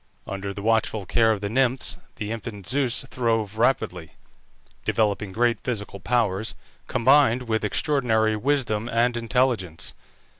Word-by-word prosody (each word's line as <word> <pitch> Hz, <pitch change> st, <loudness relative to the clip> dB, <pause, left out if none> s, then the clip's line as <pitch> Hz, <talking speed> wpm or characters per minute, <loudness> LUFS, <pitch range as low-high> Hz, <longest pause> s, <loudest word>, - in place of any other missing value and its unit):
Under 100 Hz, 0 st, -4 dB
the 100 Hz, 0 st, -7 dB
watchful 110 Hz, -2 st, +1 dB
care 115 Hz, +4 st, +3 dB
of 105 Hz, -3 st, -1 dB
the 100 Hz, -, -2 dB
Nymphs 130 Hz, +1 st, +1 dB, 0.2 s
the 105 Hz, 0 st, -5 dB
infant 110 Hz, -3 st, -6 dB
Zeus 135 Hz, -1 st, +1 dB
throve 115 Hz, -4 st, -1 dB
rapidly, 105 Hz, -10 st, 0 dB, 0.7 s
developing 105 Hz, -2 st, 0 dB
great 120 Hz, +3 st, +1 dB
physical 105 Hz, -5 st, -4 dB
powers, 110 Hz, -1 st, 0 dB, 0.3 s
combined 130 Hz, -1 st, +4 dB
with 110 Hz, -2 st, -1 dB
extraordinary 110 Hz, -2 st, +1 dB
wisdom 120 Hz, -3 st, 0 dB
and 120 Hz, +1 st, +2 dB
intelligence. 115 Hz, -8 st, 0 dB
115 Hz, 125 wpm, -24 LUFS, 105-125 Hz, 0.7 s, combined